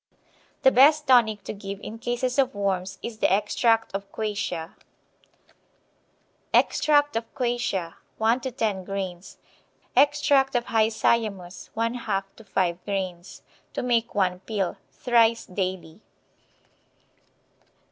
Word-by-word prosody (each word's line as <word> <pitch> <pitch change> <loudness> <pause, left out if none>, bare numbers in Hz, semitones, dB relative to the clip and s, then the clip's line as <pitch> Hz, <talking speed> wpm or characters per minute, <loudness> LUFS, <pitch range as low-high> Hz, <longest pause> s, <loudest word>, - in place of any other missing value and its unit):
The 265 - +7
best 295 +4 +5
tonic 230 -6 +4
to - - -5
give 200 -1 -7
in 225 +1 -8
cases 245 +2 -1
of 260 -4 +2
worms 190 -1 -2
is 225 -2 -6
the - - +2
extract 225 +3 +2
of 195 0 -5
quassia. 205 -6 -3 1.8
Extract 290 -2 +3
of 225 0 -3
quassia, 240 -9 -1 0.2
1 225 +3 +2
to 260 - -4
10 215 -6 -2
grains; 190 -2 -6 0.6
extract 280 -1 +3
of 240 -1 +1
hyoscyamus, 215 -4 0
1/2 230 -4 -1
to 225 - -13
5 180 -3 -1
grains. 185 -3 -5 0.3
To - - -2
make 235 -2 0
one 185 -3 +1
pill. 195 -1 -3
Thrice 230 -2 +2
daily. 185 -1 -4
220 Hz, 115 wpm, -25 LUFS, 195-240 Hz, 1.8 s, The